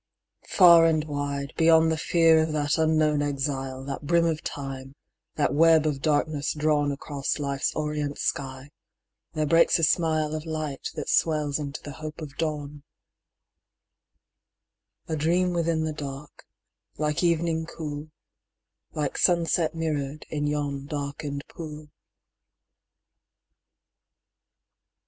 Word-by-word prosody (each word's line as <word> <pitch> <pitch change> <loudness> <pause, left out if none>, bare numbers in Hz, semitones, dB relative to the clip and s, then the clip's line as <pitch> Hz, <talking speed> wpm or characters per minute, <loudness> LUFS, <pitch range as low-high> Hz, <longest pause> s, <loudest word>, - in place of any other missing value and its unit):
Far 170 -3 +7
and 155 -2 +2
wide, 145 -2 -4
Beyond 160 -1 +5
the - - +1
fear 165 0 +4
of 160 -1 -1
that 145 +1 0
unknown 155 -2 +2
exile, 135 -2 -3
That 140 0 -5
brim 170 +3 +2
of 160 -1 0
Time, 135 -3 -6 0.4
that 150 - +1
web 160 +1 +5
of 145 -3 -1
darkness 150 -1 0
drawn 150 -1 +1
Across 140 0 -3
Life's 140 -2 -1
orient 150 -1 -2
sky, 135 +1 -3 0.6
there 155 -1 0
breaks 165 +3 +4
a 165 - -2
smile 155 -1 +2
Of 155 +1 -5
light 155 -3 -4
that - - -5
swells 150 -3 +1
into 145 -1 -6
the 145 - -7
hope 155 +1 -8
of 145 -4 -8
dawn: 150 -2 -3 2.3
A 160 - -2
dream 175 +4 +1
within 165 -2 0
the 155 -1 -2
dark, 140 -1 -8 0.5
like 150 -1 -1
evening 165 -1 +1
cool, 150 -2 -6 0.8
Like 150 -2 -2
sunset 170 -2 +2
mirror'd 150 -3 -3
in 150 -1 -1
yon 145 -2 -2
darken'd 140 -1 -4
pool. 155 -2 -9
150 Hz, 120 wpm, -26 LUFS, 145-160 Hz, 2.3 s, Far